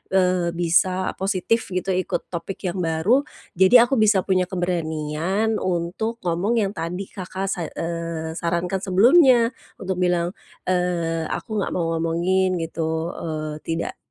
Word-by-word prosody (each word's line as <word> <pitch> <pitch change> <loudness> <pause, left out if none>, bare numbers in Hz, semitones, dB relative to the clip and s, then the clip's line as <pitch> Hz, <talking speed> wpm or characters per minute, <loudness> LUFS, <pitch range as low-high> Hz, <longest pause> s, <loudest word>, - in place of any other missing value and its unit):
eee, 180 -2 +2
bisa 175 +2 +2
positif 195 +3 +1 0.2
gitu 185 +1 -2
ikut 185 0 -2
topik 180 +2 -4
yang 175 - -5
baru, 180 - +2 0.3
jadi 235 +6 +7
aku 270 - +1
bisa 210 -3 +4
punya 185 -1 +1
keberanian 175 +3 -1
untuk 185 +6 -2
ngomong 180 +7 0
yang 195 - 0
tadi 180 -1 -4
Kakak 190 +1 -4
sa 175 -3 -2
eee, 165 0 -4
sarankan 175 +2 -1
sebelumnya 235 - +5 0.3
untuk 190 -1 -2
bilang, 175 -1 +1 0.4
eee, 170 -3 0
aku 215 - -4
nggak 200 - -1
mau 165 -2 -1
ngomongin 175 +2 +1
gitu, 160 0 -2
eee, 155 -3 -4
tidak, 165 0 -3
180 Hz, 135 wpm, -23 LUFS, 165-195 Hz, 0.4 s, jadi